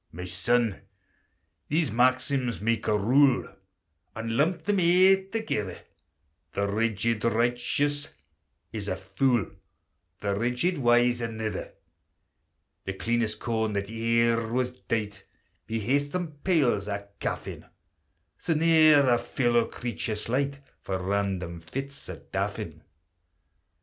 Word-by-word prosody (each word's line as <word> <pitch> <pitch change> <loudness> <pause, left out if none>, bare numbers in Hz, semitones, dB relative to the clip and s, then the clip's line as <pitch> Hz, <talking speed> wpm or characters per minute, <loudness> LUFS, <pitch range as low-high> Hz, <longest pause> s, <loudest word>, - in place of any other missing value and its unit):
"My 90 +3 -7
son, 100 +5 +1 0.9
these 155 -3 +1
maxims 130 +1 +1
make 115 +1 0
a 105 -1 +3
rule 130 +5 +4 0.7
And 115 0 -3
lump 160 +5 +1
them 200 +3 +1
aye 185 +2 +5
thegither: 110 - -2 0.8
The 100 0 0
Rigid 110 +1 0
Righteous 120 +5 0 0.6
is 105 -3 -4
a 95 - -1
fool, 100 +4 +1 0.7
The 100 -1 -1
Rigid 125 - 0
Wise 120 -1 +3
anither: 110 -2 -4 1.1
The 95 - -4
cleanest 110 +1 -1
corn 110 -2 -1
that 100 +1 -3
e'er 115 0 +1
was 125 +1 0
dight 105 -5 -4 0.5
May 115 - -1
hae 125 +6 +2
some 160 +4 -4
pyles 135 - +2
o' 100 -1 -4
caff - - -3
in; - - -8 0.7
Sae 165 - 0
ne'er 155 -3 +6
a 120 -1 +4
fellow 120 -3 +1
creature 120 -2 -4
slight 140 +6 -2 0.2
For 95 - -3
random 95 -2 -2
fits 135 - -7
o' - - -6
daffin." - - -3
115 Hz, 120 wpm, -27 LUFS, 105-140 Hz, 1.1 s, ne'er